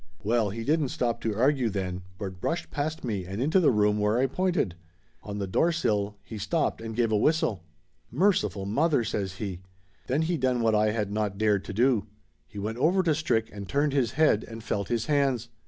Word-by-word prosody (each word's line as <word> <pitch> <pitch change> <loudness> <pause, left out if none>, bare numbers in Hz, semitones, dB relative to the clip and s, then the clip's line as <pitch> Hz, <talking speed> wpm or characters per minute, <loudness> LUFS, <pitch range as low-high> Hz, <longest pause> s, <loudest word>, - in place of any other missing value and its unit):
Well, 110 0 +2
he 115 +3 -5
didn't 150 +1 +1
stop 120 -2 -1
to 110 -2 -1
argue 130 -1 +2
then, 95 -2 -3 0.2
but 95 -3 -6
brushed 170 +1 -2
past 155 +2 -3
me 105 -7 -2
and 95 +3 -5
into 155 +9 +3
the 170 - +4
room 105 -2 +2
where 105 +2 +2
I 130 - +3
pointed. 175 - 0 0.5
On 105 -1 -6
the 100 - -2
door 160 - +2
sill 105 -10 0
he 110 - -8
stopped 150 - -1
and 110 -1 -6
give 115 -1 +1
a - - +3
whistle. 110 - +1 0.5
"Merciful 115 - +1
Mother!" 140 +5 +2
says 100 -4 -2
he. 95 -3 -5 0.5
Then 140 +5 +1
he 170 +1 0
done 125 -4 +1
what 115 -1 +3
Laughter 105 0 +3
Limited 105 -3 -1
305 105 +1 0
I - - +2
had - - -6
not 100 - -14
dared 105 -2 +2
to - - -6
do. 115 -2 +2 0.4
He - - -13
went 110 +4 -3
over 180 +7 +3
to 165 -3 +3
Strick 145 -8 0
and 100 -1 -8
turned 145 0 +1
his 130 -5 +1
head 150 -8 +3
and 115 -1 -9
felt 100 -2 -2
his 120 -2 -1
hands. 135 -6 +1
115 Hz, 220 wpm, -27 LUFS, 105-145 Hz, 0.5 s, the